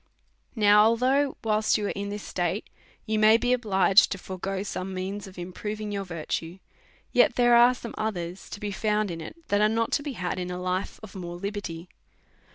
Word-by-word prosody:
Now, 210 -1 +6
although, 260 +5 +2
whilst 215 -1 +2
you 210 - -2
are - - -1
in 200 0 -4
this 205 0 -5
state, 180 +3 -2 0.4
you 215 -1 0
may 215 +1 +7
be 245 +1 +1
obliged 200 -4 +4
to 195 - -2
forego 190 +1 -4
some 190 -1 -5
means 195 +2 -4
of 190 - -13
improving 210 +4 -5
your 200 -1 -3
virtue, 170 0 -4 0.5
yet - - +4
there 240 -1 +5
are 240 +1 +6
some 235 -2 -8
others 185 -4 -4
to - - -7
be 205 0 -4
found 210 0 0
in 165 -1 -6
it, 160 - -8
that 205 0 +2
are 210 - +5
riot 225 0 0
to - - +1
be 285 -1 -5
had 185 -3 -3
in 180 0 -4
a 180 0 -4
life 185 +1 -3
of 215 - -10
more 175 -2 -6
liberty. 180 -3 -5
205 Hz, 200 wpm, -26 LUFS, 185-220 Hz, 0.5 s, may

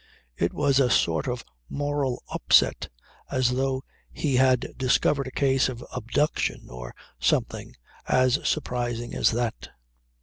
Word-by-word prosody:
It 85 - 0
was 140 -2 +2
a 130 -2 +4
sort 80 -5 +2
of 125 -1 -3 0.2
moral 145 -3 -2
upset - - +3 0.4
as 130 -1 +1
though 130 +1 -1 0.3
he 140 -5 0
had 130 -1 +2
discovered 135 +2 +1
a - - -6
case 135 -1 +2
of 120 -1 -7
abduction 125 +5 -1
or - - -8 0.2
something - - -1 0.3
as 130 +2 +3
surprising 120 -4 -2
as - - +3
that. 120 -1 -3
130 Hz, 130 wpm, -26 LUFS, 120-135 Hz, 0.4 s, a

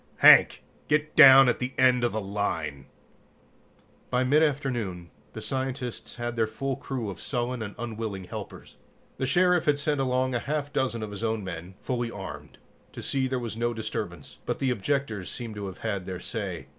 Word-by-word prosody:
"Hank, - - +7 0.2
get 150 0 +1
down 135 0 +10
at 125 - +1
the 125 +1 -3
end 125 -1 +4
of 120 - +2
the 110 - -2
line!" 80 -9 -3 1.2
By 125 0 +1
mid 145 +4 +4
afternoon, 120 - -1 0.2
the 110 - -7
scientists 130 -2 -4
had 120 -1 -4
their 115 -1 +1
full 135 +5 -3
crew 120 -5 -4
of 90 - -10
sullen 125 -1 -2
and 105 -2 -6
unwilling 110 -4 -4
helpers. - - -9 0.4
The 130 - -1
Sheriff 180 +4 +3
had 150 -1 +3
sent 145 0 0
along 130 0 +1
a 120 - +1
half 145 +2 -3
dozen 120 -4 -1
of 105 - -6
his 105 +2 -6
own 110 -2 -1
men, 95 0 -7
fully 120 -2 -2
armed, 75 -9 -8 0.4
to - - -8
see 135 -1 0
there 130 0 -1
was 120 -3 -4
no 120 +1 -1
disturbance, 105 -8 -5
but - - -1
the 130 -2 0
objectors 120 -4 -2
seemed 115 -3 -6
to 100 -1 -5
have 95 - -8
had 100 -5 -2
their 90 -1 -4
say. - - -5
120 Hz, 185 wpm, -27 LUFS, 105-130 Hz, 1.2 s, down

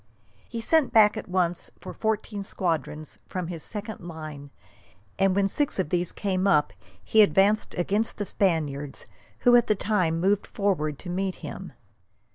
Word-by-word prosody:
He 230 -1 -4
sent 315 +4 +3
back 215 -1 +6
at 220 - -6
once 180 -2 0
for - - -8
fourteen 215 -2 -2
squadrons 160 -5 -3
from 185 -2 -4
his 170 -3 -5
second 210 +3 -3
line, 155 -4 -8 0.7
and 195 -1 +3
when 200 0 +3
six 290 +8 -1
of 185 -6 -1
these 175 +1 +2
came 195 -1 -1
up 150 - +3 0.3
he 220 - +4
advanced 205 +1 +3
against 205 +5 -1
the 205 - -2
Spaniards, 150 -8 -1 0.4
who 245 0 +6
at 240 - +5
the 215 - +4
same - - -9
time 180 -6 +2
moved 195 +3 +1
forward 160 -8 -1
to 175 - -6
meet 190 +1 -1
him. - - -7
190 Hz, 165 wpm, -26 LUFS, 165-210 Hz, 0.7 s, back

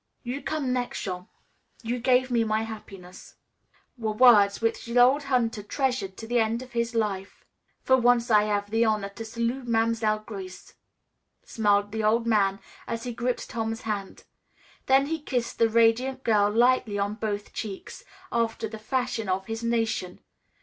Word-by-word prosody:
"You 255 +3 -4
come 285 -5 -2
next, 250 -1 -3
Jean. 180 -1 -5 0.6
You 240 +2 -2
gave 255 +1 +2
me 235 -1 +3
my 220 0 0
happiness," 195 -5 -10 0.6
were 220 -2 -1
words 210 -4 +6
which 225 +1 -1
the 235 +1 -2
old 265 +4 +5
hunter 240 -5 0
treasured 245 -4 -2
to 225 - -7
the 240 +1 +1
end 225 +2 0
of 255 - -14
his 235 0 -2
life. 200 -3 -3 0.4
"For 260 - +5
once 245 -1 +3
I 210 -1 +5
hav' 205 -1 -1
the 225 +1 +3
honor 215 -3 0
to 200 +3 -8
salut' 235 +3 -3
Mam'selle 225 -2 +1
Grace," 190 -4 -9 0.7
smiled 205 -2 +1
the 220 0 -3
old 230 +2 +2
man 200 -4 +2 0.3
as 230 0 -4
he 245 - -4
gripped 240 +2 -2
Tom's 225 0 -3
hand. 205 -3 -5 0.6
Then 270 +1 +5
he 320 +2 -2
kissed 245 -5 -3
the 230 - +4
radiant 235 +4 +2
girl 210 -3 +3
lightly 230 -1 +2
on 200 +1 -1
both 210 -2 -4
cheeks, 200 -4 -7 0.3
after 225 -1 -1
the 220 0 -9
fashion 245 -2 -2
of 190 +1 -1
his 225 +2 -5
nation. 225 -6 -1
225 Hz, 165 wpm, -26 LUFS, 210-245 Hz, 0.7 s, words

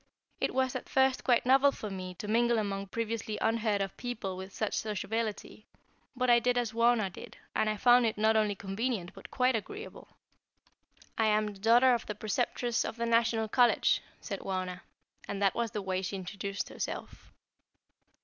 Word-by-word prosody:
It - - -1
was 260 -1 +1
at - - -5
first 265 -1 +2
quite 245 -2 +3
novel 270 +2 +5
for 215 -6 -7
me 185 -1 -6
to 205 - -7
mingle 235 +2 +3
among 200 -2 -2
previously 225 0 -3
unheard 220 -3 +1
of 195 - -6
people 225 -6 -4
with 190 +1 -8
such 215 +2 -2
sociability, 215 0 -3 0.5
but 255 0 0
I 240 -1 +6
did 245 +1 +1
as 240 -2 -1
Wauna 230 -4 +3
did, - - -11 0.2
and 215 - +2
I 215 - -1
found 245 +2 +5
it 220 - -2
not 220 +1 +3
only 210 -2 +2
convenient 195 -1 -3
but - - -12
quite 255 -1 +2
agreeable. 410 - -7 1.1
"I 220 - +4
am 215 0 +3
the 195 - -15
daughter 240 +5 +5
of 235 - -2
the 210 - -4
Preceptress 240 +3 -1
of - - -4
the 235 - -1
National 230 -1 +2
College," 245 +2 +3 0.2
said 195 -4 -5
Wauna; 185 -1 -4 0.5
and 200 - -4
that 200 -1 +3
was 235 -1 -1
the 210 -1 -4
way 185 -1 -1
she 195 +1 -4
introduced 195 +1 -4
herself. - - -6
220 Hz, 180 wpm, -30 LUFS, 200-240 Hz, 1.1 s, I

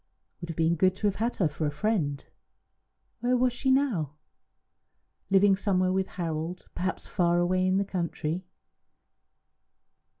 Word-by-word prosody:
It - - -41
would 170 - -6
have 165 - -4
been 165 0 +3
good 185 +2 +2
to 210 - -4
have 200 -1 +1
had 230 +3 -1
her 180 - +2
for 150 +1 -2
a - - -1
friend. 150 -5 -1 0.9
Where 250 +1 +2
was 250 0 +2
she 265 +2 -1
now? 230 - +1 1.1
Living 195 0 +5
somewhere 185 -2 +1
with 190 0 0
Harold, 165 0 -4
perhaps 185 +1 -3
far 175 -1 +1
away 185 +1 +2
in 185 +1 +2
the 200 - +1
country. 175 -2 -3
185 Hz, 155 wpm, -28 LUFS, 165-200 Hz, 1.1 s, Living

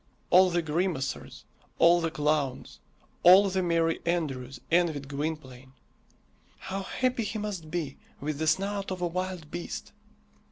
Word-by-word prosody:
All 185 +1 +7
the 175 -1 0
grimacers, 160 -3 -2 0.3
all 170 +1 +6
the 165 - 0
clowns, 150 -4 -1 0.4
all 190 +3 +8
the 190 0 +1
merry 165 -2 +1
andrews 140 -7 -2
envied 160 -5 +2
Gwynplaine. 140 -3 -5 0.8
How 195 +1 -5
happy 250 +4 -1
he 215 +1 -3
must 200 -7 -5
be 155 -5 -3 0.2
with 150 0 -3
the 160 - -1
snout 195 +4 0
of 185 -1 -4
a - - +2
wild 180 -3 -4
beast! 175 0 -6
170 Hz, 135 wpm, -28 LUFS, 150-185 Hz, 0.8 s, all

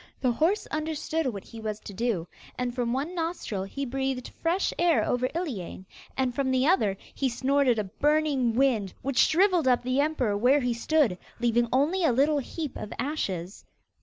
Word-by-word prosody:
The 255 - +2
horse 330 - +1
understood 310 0 -2
what 205 -6 -4
he 230 - -11
was 215 -1 -3
to 205 - -9
do, 200 -5 -1 0.3
and 250 -1 -2
from 240 -2 -1
one 280 +8 -2
nostril 330 - -3
he 275 +8 -4
breathed 265 0 -2
fresh 345 +4 +1
air 340 -2 +3
over 250 +1 0
Iliane, 225 - -4 0.3
and 260 -2 +1
from 270 +1 0
the 260 0 +2
other, 215 - +2 0.2
he 270 - 0
snorted 260 0 +2
a 215 - 0
burning 275 +2 +1
wind 235 -7 +1
which 275 -2 0
shrivelled 360 -3 +4
up 250 -1 +3
the 255 +3 +1
emperor 270 -9 0
where 255 +7 +4
he 245 -1 0
stood, 235 - +1 0.2
leaving 240 0 +2
only 305 +9 +2
a 320 - +4
little 285 +4 +3
heap 295 +2 -5
of 210 - -7
ashes. 200 - -3
260 Hz, 180 wpm, -27 LUFS, 235-305 Hz, 0.3 s, shrivelled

